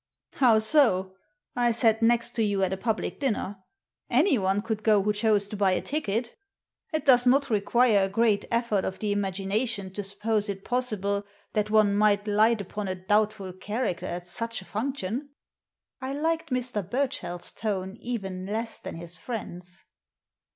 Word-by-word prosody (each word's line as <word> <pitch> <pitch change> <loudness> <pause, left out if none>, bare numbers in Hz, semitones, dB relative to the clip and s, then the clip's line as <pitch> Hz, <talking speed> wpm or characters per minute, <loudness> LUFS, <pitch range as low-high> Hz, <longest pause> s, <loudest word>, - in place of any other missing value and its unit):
" - - -43
How 235 -4 +6
so? 220 -6 +3 0.4
I 245 -1 +3
sat 225 -1 +3
next 235 0 +3
to 230 - -1
you 200 -2 +1
at 190 0 +1
a - - -3
public 220 +2 -2
dinner. 215 -7 -1 0.5
Anyone 205 - +2
could 220 -2 -3
go 210 -2 +4
who 210 +1 +1
chose 210 -1 +2
to 210 - -5
buy 195 -2 +2
a - - 0
ticket 240 -5 -2 0.6
It 310 -1 -2
does 250 -2 +6
not 275 +1 +3
require 215 0 +3
a - - -4
great 215 0 +2
effort 230 -4 +1
of 190 - -3
the 210 -1 -2
imagination 200 +1 -2
to 205 - -3
suppose 205 +2 -1
it 195 -1 -5
possible 210 -5 +1 0.3
that 210 0 0
one 210 -2 +4
might 205 0 +3
light 215 +1 +3
upon 200 +1 -5
a 185 - -2
doubtful 205 0 0
character 205 0 -3
at 175 0 -5
such 230 +6 -3
a - - -18
function." 255 +3 -3 0.7
I 260 +1 -3
liked 325 +3 -1
Mr. 250 -4 -2
Burchell's 200 -5 -3
tone 195 -3 -3
even 195 -6 -4
less 225 +2 -3
than - - -7
his 170 +1 -6
friend's. 180 -6 -7
210 Hz, 165 wpm, -27 LUFS, 195-235 Hz, 0.7 s, How